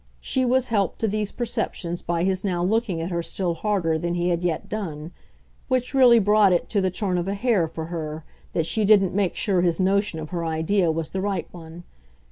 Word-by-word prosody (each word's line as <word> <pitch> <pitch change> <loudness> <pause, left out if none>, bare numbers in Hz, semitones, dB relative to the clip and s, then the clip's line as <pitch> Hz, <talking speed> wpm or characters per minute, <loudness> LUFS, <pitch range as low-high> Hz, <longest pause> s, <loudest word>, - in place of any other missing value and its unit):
She 260 - 0
was 255 +1 +1
helped 200 -5 0
to 225 - +2
these 210 0 -2
perceptions 220 -7 -3
by 170 0 -1
his 185 0 0
now 180 -3 -1
looking 205 -2 0
at 170 +3 -4
her 170 -1 -1
still 175 +1 -2
harder 170 -4 0
than 170 +1 -2
he 175 0 0
had 175 0 -1
yet 170 -3 -1
done 165 -7 -5 0.6
which 255 0 -1
really 250 -3 +7
brought 210 -1 +4
it 175 - 0
to 205 - +1
the 190 - +1
turn 180 -1 -1
of 175 - -3
a 200 - -1
hair, 205 -6 +1
for 160 0 -6
her, 155 -1 -5 0.3
that 165 - 0
she 215 +6 0
didn't 200 -3 +4
make 195 -2 0
sure 190 -4 +1
his 175 -1 +1
notion 195 -1 +1
of 155 -1 -7
her 170 -2 -2
idea 165 +3 +1
was 160 0 -3
the 190 - -2
right 195 -3 -2
one. 170 0 -11
185 Hz, 220 wpm, -24 LUFS, 170-210 Hz, 0.6 s, really